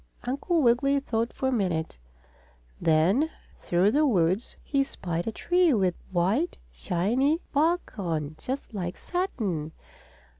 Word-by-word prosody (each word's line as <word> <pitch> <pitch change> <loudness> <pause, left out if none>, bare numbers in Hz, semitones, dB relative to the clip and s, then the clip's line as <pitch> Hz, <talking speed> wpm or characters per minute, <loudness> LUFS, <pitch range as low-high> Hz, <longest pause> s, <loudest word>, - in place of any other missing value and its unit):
Uncle 290 +6 0
Wiggily 275 +4 +3
thought 230 -3 -1
for 265 - -1
a - - -1
minute. 175 - -1 0.8
Then, 180 - +3 0.3
through 180 +4 +2
the 295 +6 +3
woods, 190 - +1
he 275 -1 +1
spied 175 -9 -4
a - - 0
tree 350 +3 +2
with 190 -4 +2 0.2
white, 195 - +1
shiny 240 - +1
bark 325 +5 +1
on, 155 -5 -2
just 260 -2 -5
like 180 -4 -4
satin. 200 - -2
225 Hz, 125 wpm, -27 LUFS, 175-280 Hz, 0.8 s, Wiggily